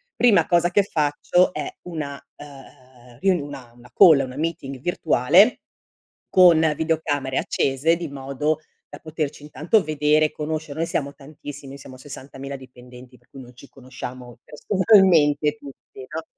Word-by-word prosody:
Prima 240 -5 +4
cosa 175 0 +2
che 200 +2 +3
faccio 160 +2 +1
è - - -4 0.2
una, 150 -5 -6 0.2
ehm, 130 -4 -16
riun 185 -1 +2
una 135 -4 -10
una 120 0 -18
call, 160 -8 +7
una 130 -1 -6
meeting 145 -5 -4
virtuale 170 - +3 0.7
con 175 -3 +6 0.2
videocamere 145 -4 -2
accese 140 +5 0
di 170 -1 -5
modo 140 +3 -3 0.3
da 145 - -11
poterci 155 -2 -5
intanto 155 +8 0
vedere, 155 0 +1
conoscere, 155 -1 -5
noi 165 - 0
siamo 140 0 -3
tantissimi, 145 -1 -11
noi 140 - -10
siamo 130 -1 -12
60.000 135 0 -9
dipendenti 125 0 -15
per 120 - -33
cui 135 - -12
non 125 -1 -15
ci 140 - -15
conosciamo 125 -2 -10
personalmente 155 -5 +3
tutti, 135 -2 -13
no 160 +1 -6
145 Hz, 145 wpm, -22 LUFS, 135-160 Hz, 0.7 s, call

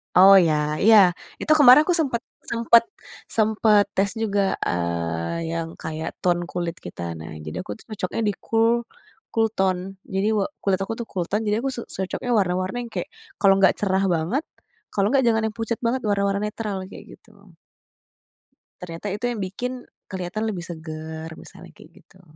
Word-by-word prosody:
Oh 195 +2 +9
ya, 170 -4 +4 0.3
iya, 220 +1 +8 0.4
itu - - -5
kemarin 275 -1 +9
aku 355 +3 +1
sempet 260 -7 0 0.3
sempet 235 0 +5 0.5
sempet 215 -1 +4
tes 200 +1 +2
juga, 200 -3 +1
eee, 85 - -2
yang 165 0 -2
kayak 160 0 -5
tone 175 -1 +1
kulit 175 -1 -3
kita. 90 - -8 0.2
Nah 80 -1 -8
jadi 75 - -6
aku 105 - -5
cocoknya 190 - -5
di - - -1
cool, 230 +1 +2 0.5
cool 225 0 +3
tone. 190 0 -1
Jadi 195 +2 -1
wa 200 - +1 0.2
kulit 195 -2 +1
aku 195 +3 -3
tuh 235 - -5
cool 180 -3 -2
tone 210 +5 -1
jadi 210 +1 +2
aku - - +1
su 240 - -4
cocoknya 190 +6 -4
warna-warna 185 +1 0
yang 230 - -12
kayak, - - -4 0.3
kalau 195 -1 +6
enggak 195 -1 +5
cerah 195 -1 +1
banget 180 - 0 0.5
kalau 200 0 +2
enggak 265 0 +3
jangan 225 -1 +3
yang 215 - -13
pucat 225 0 -2
banget 250 +2 0
warna-warna 200 -1 +1
netral 210 -1 -4
kayak 190 - -12
gitu. 200 -5 -21 1.3
Ternyata 170 +2 -7
itu 210 +4 -3
yang 235 -3 -4
bikin 245 +7 -4 0.4
keliatan 190 +4 -4
lebih 185 -5 -4
seger, 160 -1 -7
misalnya - - -12
kayak - - -16
gitu. 185 - -22
195 Hz, 170 wpm, -23 LUFS, 175-225 Hz, 1.3 s, Oh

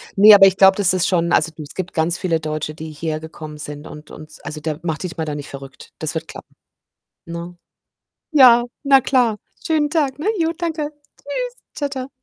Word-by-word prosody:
Ne, 210 +2 +9
aber 195 -1 +9
ich 190 0 +1
glaube, 190 0 +6
das 195 -3 +3
ist 185 -2 +1
schon 170 -2 +1
also 165 - +3
du, 155 - -9
es 145 - -10
gibt 185 -1 -5
ganz 165 +2 +1
viele 165 -3 0
Deutsche, 155 0 -4
die 160 0 -8
hierher 155 +1 -4
gekommen 155 -1 -9
sind 150 0 -7
und 150 0 -11
und 155 0 -11
also 155 - -6
da 155 0 -4
mach 160 -3 -2
dich 175 -1 -6
mal 160 - -2
da 150 -1 -4
nicht 145 -1 -7
verrückt. 135 -1 -11
Das 155 +1 -3
wird 160 0 -4
klappen, - - -12 0.7
ne? 170 +1 -7 0.7
Ja, 250 -6 +7 0.2
na 275 -1 +6
klar. 245 -5 +2 0.3
Schönen 305 -2 +1
Tag, 290 -4 0
ne? 305 - -5
Jo, 325 -1 +1
danke. 320 -4 -3 0.3
Tschüss. - - -5 0.2
Tschau, 290 -2 -2
tschau. 265 -2 -6
175 Hz, 210 wpm, -20 LUFS, -, 0.7 s, Ne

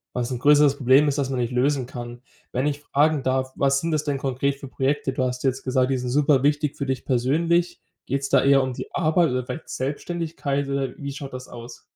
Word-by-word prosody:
was 125 -1 -1
'n 125 - -2
größeres 145 0 +5
Problem 135 +3 +4
ist, 145 0 0
das 135 -1 -1
man 130 - -1
nicht 120 0 -1
lösen 130 0 +1
kann. 120 -1 -8 0.3
Wenn 130 +4 0
ich 145 0 -2
fragen 150 0 +1
darf, 130 0 0
was 140 0 +2
sind 165 - -2
das 155 -1 0
denn 145 -2 -2
konkret 140 +1 -1
für 140 - -9
Projekte? 135 +1 -1
Du 130 - -1
hast 125 0 -2
jetzt 135 -1 0
gesagt, 130 0 +1
die 135 - +1
sind 125 0 -4
super 145 -1 +3
wichtig 145 0 +1
für 140 - -3
dich 130 -1 -2
persönlich. 165 +7 +1 0.2
Geht's 135 +1 -2
da - - +4
eher 140 0 +5
um 130 -1 -3
die - - -8
Arbeit 165 -2 +2
oder 125 0 -1
vielleicht 160 - -7
Selbständigkeit 145 0 -3
oder 140 -1 -1
wie 140 -1 -5
schaut 140 -1 -8
das 130 0 -7
aus? 120 0 -11
135 Hz, 230 wpm, -24 LUFS, 130-145 Hz, 0.3 s, größeres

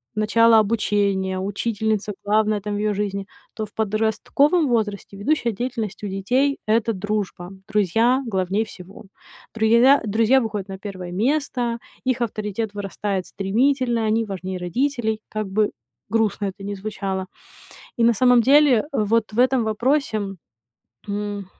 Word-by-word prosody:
начало 225 +2 +4
обучения, 200 -3 +1
учительница, 210 +1 -1
главная 215 0 +2
там 205 +1 -3
в - - -2
её 210 0 0
жизни, 200 -1 -3 0.3
то 220 - -4
в 210 - -8
подростковом 220 - +1
возрасте 210 -5 -2
ведущая 235 0 0
деятельность 230 -3 -4
у - - -2
детей- 250 +9 0
это 225 +1 +2
дружба. 195 -2 -3 0.2
Друзья 225 +6 +2
главней 190 +3 0
всего. 195 -2 -12 0.5
Друя 235 +5 +5
друзья 225 +5 +3
выходят 210 -4 -4
на 190 - -6
1 185 -3 -7
место, 240 +2 0 0.3
их 255 -1 0
авторитет 215 -1 -3
вырастает 200 -1 -3
стремительно, 235 +5 0
они 225 +1 +1
важнее 190 -2 -5
родителей, 220 +3 -1
как 215 -2 -3
бы 210 +2 +1 0.4
грустно 215 -2 0
это 195 +1 -8
ни 205 0 -4
звучало. 195 -2 -4 0.8
И - - +5
на 235 0 +5
самом 245 +2 +5
деле, 275 -1 +5
вот 220 -2 +1
в 215 - -6
этом 255 -1 +3
вопросе, 235 +2 0 0.9
м, 205 -1 -4
215 Hz, 135 wpm, -22 LUFS, 200-235 Hz, 0.9 s, Друя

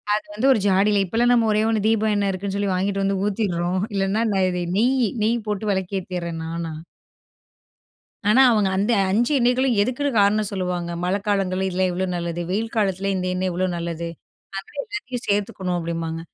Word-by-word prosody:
அது 210 0 -3
வந்து 230 +6 +2
ஒரு 235 - +1
ஜாடில 200 +1 +3
இப்பெல்லாம் 235 +6 +2
நம்ம 230 -2 +3
ஒரே 210 0 +2
ஒண்ணு, 215 -2 0
தீபம் 220 -1 +2
எண்ணெய் 200 -1 +1
இருக்குன்னு 195 +1 -4
சொல்லி 200 -1 0
வாங்கிட்டு 195 +2 0
வந்து 195 0 0
ஊத்திர்றோம். 185 -4 -1
இல்லன்னா, 195 +3 +1 0.3
இது 180 -1 -2
நெய், 250 +2 +3 0.2
நெய் 225 0 0
போட்டு 210 0 -2
விளக்கு 190 0 -1
ஏத்திறேன் 170 -2 -5
நானா. 165 0 -4 1.6
ஆனா 245 +6 +6
அவங்க 210 -4 +3
அந்த 205 +5 +1 0.2
5 235 +8 +2
எண்ணெய்களும் 250 +1 +2
எதுக்குன்னு 255 +6 -1
காரணம் 205 +1 +3
சொல்லுவாங்க. 180 -3 -2
மழைக்காலங்கள்ல 190 -1 0
இதில 185 +1 +1
இவ்ளோ 185 +2 -1
நல்லது? 170 0 -3
வெயில் 220 +5 -2
காலத்துல 195 -2 0
இந்த 185 0 -2
எண்ணெய் 185 0 -1
இவ்வளோ 185 +2 0
நல்லது? 170 0 -4 0.5
அத 195 - -6 0.2
எல்லாத்தையும் 255 - -6
சேர்த்துக்கணும் 195 -3 -1
அப்படிம்பாங்க. 165 -1 -3
195 Hz, 165 wpm, -22 LUFS, 180-215 Hz, 1.6 s, ஆனா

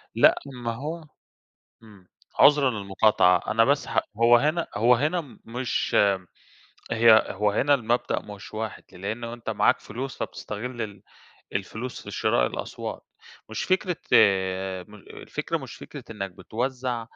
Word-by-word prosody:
لأ، - - +6 0.3
ما 115 - -1
هو 155 +7 -5 0.8
امم، 100 -5 -17 0.3
عذرًا 145 -2 +6
للمقاطعة، 100 -3 +3
أنا 115 +1 +4
بس 140 +3 +1
هَ - - +2 0.2
هو 120 +1 +7
هنا 155 +6 +1
هو 120 +4 +5
هنا 150 +3 -2
مش 120 +2 -2 1.0
هي 115 -1 +6
هو 105 +1 +1
هنا 140 +7 +3
المبدأ 120 -2 0
مش 105 -1 -11
واحد 110 0 -5
لأنه 110 +6 -5
أنت 120 -1 -7
معاك - - +3
فلوس 130 +5 -6
فبتستغل 120 +3 -5
ال 105 -3 -6 0.5
الفلوس 110 +6 -4
في - - -8
شراء - - +2
الأصوات، - - -6 0.5
مش 110 - -3
فكرة 185 -1 +1 0.9
م 105 - -14
الفكرة 105 - -5
مش - - -9
فكرة - - -10
إنك 100 -3 -5
بتوزع 125 +4 -3
115 Hz, 135 wpm, -25 LUFS, 105-130 Hz, 1.0 s, هو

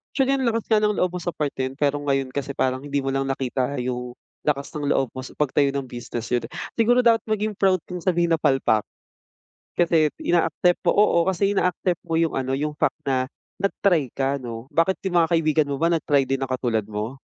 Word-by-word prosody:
Actually 270 0 +2
ang 255 - +1
lakas 230 -1 -2
nga 215 -2 +3
ng 210 -1 +1
loob 180 -1 +1
mo 180 - -4
sa 175 - -2
part 150 -4 -2
na 130 0 -2
'yon 135 - -13
pero 145 -1 +1
ngayon 135 -2 -1
kasi 140 -1 -4
parang 130 0 0
hindi 145 0 -3
mo 135 -1 -1
lang 135 0 -1
nakita 135 +1 -1
yung, 125 0 -4 0.2
lakas 140 -2 -1
ng 145 -2 -3
loob 135 -4 +1
mo 130 - -6
sa 130 - -11
pagtayo 145 -1 +2
ng 140 0 -2
business, 120 -1 -6
yon. 120 -1 0 0.3
Siguro 245 +2 +4
dapat 230 -1 +5
maging 215 0 -1
proud 190 -1 +4
kang 180 -1 -6
sabihin 170 -1 +1
na 165 - +1
palpak. 135 -7 +2 0.9
Kasi 165 -3 +3
ina-accept 175 +1 +2
mo - - +3
oo, 205 -4 +4
kasi 200 +2 0
ina-accept 180 -1 0
mo 165 - -4
yung 165 -1 +1
ano 130 0 -1
yung 150 +2 -2
fact - - 0
na 130 -1 +2 0.3
nag-try 180 - +1
ka 135 +1 0
'no. 120 -1 -7
Bakit 165 +3 +1
yung 180 - -3
mga 165 - -1
kaibigan 155 -2 +2
mo 140 - -2
ba 165 - +4
nag-try 145 -5 +2
din 135 - 0
na 130 - -4
katulad 120 -4 0
mo? 110 +6 -4
145 Hz, 220 wpm, -23 LUFS, 135-175 Hz, 0.9 s, dapat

